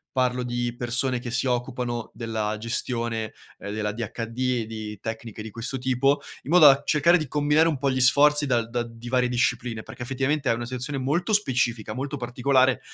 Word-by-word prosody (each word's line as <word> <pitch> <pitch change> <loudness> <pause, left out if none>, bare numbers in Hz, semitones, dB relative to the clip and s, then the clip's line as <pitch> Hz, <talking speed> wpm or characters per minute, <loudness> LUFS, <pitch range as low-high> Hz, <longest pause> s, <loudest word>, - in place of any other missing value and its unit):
parlo 125 -1 +1
di 120 0 -2
persone 120 +1 0
che 120 0 -6
si 125 +2 -1
occupano 120 -2 -2
della 110 -2 -3
gestione, 115 0 -2 0.2
ehm, 100 - -7
dell'ADHD 115 +2 -4 0.2
e - - -4
di 110 -1 -7
tecniche 110 -1 -6
di 110 0 -8
questo 125 +5 -3
tipo, 130 +2 +1 0.2
in 145 - -6
modo 170 -4 +8
da 140 0 +5
cercare 165 +4 +4
di 155 -4 -4
combinare 150 +3 +3
un 160 -4 0
po' 135 +1 0
gli 130 - -1
sforzi 145 +3 +5
dal 120 -4 0
da 120 0 -1
di 115 0 -10
varie 125 0 +2
discipline. 120 -2 -1
Perché, 120 - -9
effettivamente, 135 +3 -1
è - - +4
una 120 +1 -4
situazione 130 +3 -3
molto 165 +10 0
specifica, 125 - +1
molto 135 +3 -4
particolare, 130 +1 +2
125 Hz, 185 wpm, -25 LUFS, 115-135 Hz, 0.2 s, modo